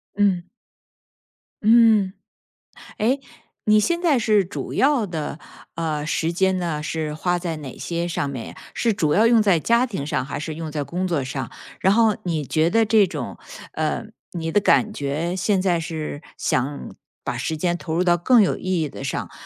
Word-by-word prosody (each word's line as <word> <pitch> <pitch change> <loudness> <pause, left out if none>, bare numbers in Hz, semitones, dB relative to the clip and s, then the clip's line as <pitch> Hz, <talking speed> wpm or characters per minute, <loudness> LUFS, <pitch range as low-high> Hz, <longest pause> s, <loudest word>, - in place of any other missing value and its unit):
嗯。 195 -4 +2 1.2
嗯， 220 -3 +5 0.9
哎 250 +6 +2 0.5
你 215 0 +6
现 340 +10 +1
在 320 -7 +3
是 210 -3 +3
主 180 - -6
要 270 -6 +3
的， 160 -3 -4 0.3
呃， 155 -3 -2
时 160 +1 0
间 190 +1 +1
呢， 160 -4 -2
是 155 -1 -3
花 175 +3 0
在 170 -2 -3
哪 140 -4 -8
些 170 0 -2
上 145 -4 -2
面 125 -5 -5
呀？ - - -12 0.2
是 230 -3 +1
主 155 -6 +1
要 215 +6 +4
用 230 -1 +5
在 190 -6 +3
家 235 +7 +2
庭 165 -11 -4
上 130 - -1
还 140 - -5
是 155 +1 -4
用 160 0 -6
在 150 -1 -2
工 180 +7 -2
作 160 -7 0
上？ 130 -2 -4 0.3
然 190 - +3
后 220 -1 +4
你 160 -4 -1
觉 160 +4 +2
得 225 +3 +3
这 215 -2 +4
种 180 - -6 0.3
呃， - - -2 0.3
你 165 -2 -3
的 205 - +4
感 215 +1 +3
觉， 155 +5 -2
现 195 +1 +1
在 180 -3 +1
是 155 -2 -5 0.2
想 140 +3 -2 0.3
把 - - -3
时 160 - -2
间 175 +2 0
投 160 -2 -4
入 180 - +2
到 175 -1 +4
更 240 +8 +4
有 - - +1
意 185 -3 -1
义 150 - -1
的 135 - -9
上， 140 - -3
175 Hz, 200 characters per minute, -22 LUFS, 155-210 Hz, 1.2 s, 你